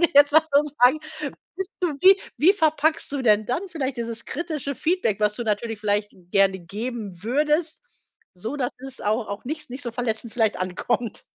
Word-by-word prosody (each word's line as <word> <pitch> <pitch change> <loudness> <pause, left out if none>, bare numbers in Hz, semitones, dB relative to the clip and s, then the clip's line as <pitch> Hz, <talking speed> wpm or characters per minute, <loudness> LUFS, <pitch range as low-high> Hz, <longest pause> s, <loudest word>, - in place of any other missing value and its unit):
würde 340 - +6
ich - - -22
jetzt 285 0 +7
mal 315 - +7
so 285 - +7 0.2
sagen, 260 +5 +6 0.6
bist 385 0 -3
du 340 -5 0
wie 380 +1 +8 0.2
wie 355 +6 +6
verpackst 315 -6 +1
du 275 -2 -2
denn 215 -2 +4
dann 250 +10 -1
vielleicht 275 -7 -3
dieses 230 -1 -5
kritische 305 -5 -4
Feedback, 315 - +1
was 210 0 +2
du 240 - -3
natürlich 220 0 -2
vielleicht 205 0 0 0.2
gerne 195 -1 +3
geben 205 0 -6
würdest, 300 - +1 0.5
so 220 +10 -5
dass 250 -3 -1
es 265 0 -8
auch 215 +2 0
auch 200 +3 -6
nicht 305 +4 -3
s 305 - -13
nicht 260 +3 -5
so 240 - -2
verletzend 230 -2 -3
vielleicht 220 -3 +1
ankommt. 185 +5 -2
245 Hz, 195 wpm, -24 LUFS, 215-300 Hz, 0.6 s, wie